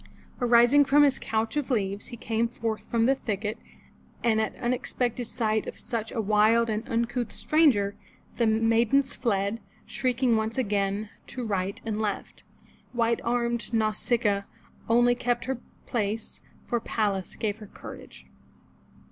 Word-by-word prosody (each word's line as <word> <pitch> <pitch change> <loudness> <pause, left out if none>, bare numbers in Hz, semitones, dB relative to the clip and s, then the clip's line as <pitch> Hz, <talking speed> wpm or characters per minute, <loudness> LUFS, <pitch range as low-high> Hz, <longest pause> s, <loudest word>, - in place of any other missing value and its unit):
Arising 240 +4 +6
from 290 +2 +5
his 275 -2 +3
couch 225 +2 -1
of 295 -2 -1
leaves, 205 -4 -1
he 240 - -8
came 225 +1 0
forth 225 -2 -4
from 230 -1 +2
the 265 - +5
thicket, 215 -4 -3 0.6
and 220 -2 +3
at 220 - -2
unexpected 245 0 -1
sight 220 -1 -1
of - - -6
such 225 -3 -4
a - - -3
wild 220 +2 +3
and 215 +2 -3
uncouth 235 0 -1
stranger, 225 -5 +3 0.4
the 235 - +3
maidens 230 +4 +3
fled, 205 -2 0 0.3
shrieking 250 -2 +1
once 220 +2 -1
again, 205 -3 0 0.2
to 250 -2 -5
right 195 -2 -2
and 220 -1 -2
left. 210 -2 -3 0.5
White 235 -1 +1
armed 235 0 -1
Nau 215 -1 +2
sic'a 215 -1 +1
a, 200 - -8 0.4
only, 240 +1 +5
kept 245 0 -1
her 265 -2 -2 0.3
place, 220 -1 -3 0.2
for 240 - 0
Pallas 205 -4 -1
gave 210 -1 -2
her 210 - -10
courage. - - -11
230 Hz, 150 wpm, -27 LUFS, 215-240 Hz, 0.6 s, Arising